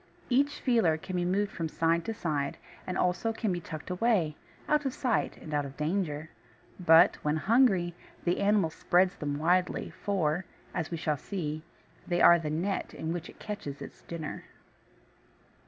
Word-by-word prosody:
Each 285 +3 +2
feeler 225 - +3
can 185 +3 -6
be 175 -1 0
moved 195 +3 +1
from 165 -2 -3
side 165 +2 +1
to 225 - -2
side, 145 -7 -2 0.3
and 185 - -2
can - - +3
also 180 +5 0
be 215 -6 -1
tucked 155 0 -7
away, 180 -6 +2 0.3
out 300 0 +3
of 270 -2 -2
sight 250 -4 0
and 155 - -9
out 145 -1 +1
of 135 -1 -9
danger; 155 -1 -2 0.5
but, 165 -2 +6
when 150 0 -1
hungry, 195 -3 +3 0.3
the 175 0 +1
animal 200 -5 +3
spreads 180 +3 +2
them 145 -1 -2
widely, 180 +4 +1
for, 180 -2 -1 0.3
as 170 -3 -2
we 170 - -3
shall 155 -2 0
see, 155 -2 -4 0.5
they 175 -1 +1
are 170 0 +8
the 155 -2 -3
net 175 +6 -2
in 160 +1 -3
which 175 -1 -5
it - - -14
catches 200 -10 -6
its - - -10
dinner. 165 -3 -6
175 Hz, 170 wpm, -30 LUFS, 155-200 Hz, 0.5 s, are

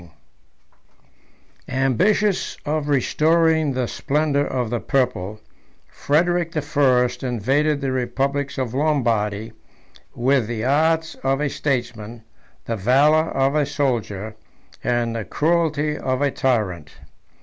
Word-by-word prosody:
] - - -36 0.2
Ambitious 200 - +1
of 150 0 -1
restoring 160 +2 +2
the 125 -1 -1
splendor 145 +2 0
of 125 -3 -2
the 120 - -1
purple, 110 -7 -1 0.5
Frederic 170 +3 0
the 155 - -1
First 125 -5 +2
invaded 135 +5 0
the 135 -1 -1
republics 135 +3 -2
of 130 -3 -2
Lombardy, 115 -8 0 0.6
with 130 -1 +2
the 115 -1 -3
arts 160 +4 +2
of 135 +1 +1
a 150 -1 0
statesman, 120 -5 -3 0.4
the 115 - -2
valor 140 +9 +3
of 135 +1 +1
a 150 -1 +2
soldier, 110 -7 -2 0.5
and 120 -1 0
the 115 - -3
cruelty 155 +1 0
of 130 -1 -1
a 140 - +2
tyrant. 100 - -1
135 Hz, 115 wpm, -22 LUFS, 120-150 Hz, 0.6 s, valor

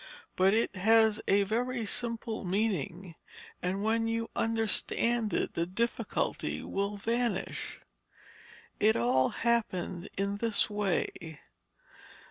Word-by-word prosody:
But 190 +3 +4
it 225 -2 0
has 220 +2 +4
a 200 +1 +4
very 235 +3 -1
simple 230 0 -1
meaning, 185 -3 -1 0.5
and 190 +3 -1
when 225 +1 +1
you 230 0 -2
understand 225 0 +1
it - - -1
the 170 0 -1
difficulty 230 +6 -2
will 200 +1 -2
vanish. 230 -1 -2 1.0
It 215 +1 +4
all 125 +2 +3
happened 200 -6 -1
in 200 +1 -1
this 220 -1 0
way. 175 -6 -2
210 Hz, 105 wpm, -30 LUFS, 190-230 Hz, 1.0 s, But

